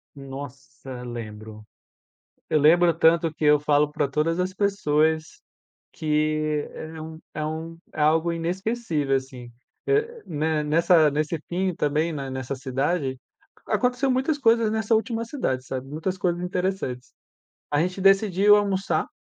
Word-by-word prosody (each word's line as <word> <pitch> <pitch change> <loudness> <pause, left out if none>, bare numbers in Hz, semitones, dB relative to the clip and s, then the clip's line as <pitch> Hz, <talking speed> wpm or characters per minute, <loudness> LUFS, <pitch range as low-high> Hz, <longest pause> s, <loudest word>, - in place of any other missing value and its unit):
Nossa, 135 -1 -9
lembro. 110 -3 -8 0.9
Eu 155 - +3
lembro 170 +3 +5
tanto 165 0 +3
que 160 - -7
eu 150 0 +6
falo 150 0 +2
para 145 - 0
todas 155 +5 0
as 185 +1 -1
pessoas 160 -6 0 0.5
que 155 -1 0
é 160 0 -8
um 160 0 -8
é 155 - -3
um 160 +2 -5 0.2
é 155 - -3
algo 160 +3 +3
inesquecível, 170 -4 -1
assim. 130 -2 -5 0.4
Eh, 445 +2 0
ne 155 0 -1
nessa 160 +1 +4
nesse 155 +3 -1
Pinho 185 0 -1
também, 155 +3 0
nessa 135 -2 -4
cidade, 135 +2 -1 0.5
aconteceu 250 +2 +1
muitas 265 +4 +1
coisas 230 -4 +3
nessa 220 +1 +1
última 230 +1 -1
cidade, 135 - -2
sabe. 130 0 -5
Muitas 160 +6 -3
coisas 175 -2 -1
interessantes. 180 - -3 0.6
A 145 - +2
gente 180 +3 -1
decidiu 195 +1 +5
almoçar, 195 -2 0
160 Hz, 135 wpm, -24 LUFS, 145-190 Hz, 0.9 s, eu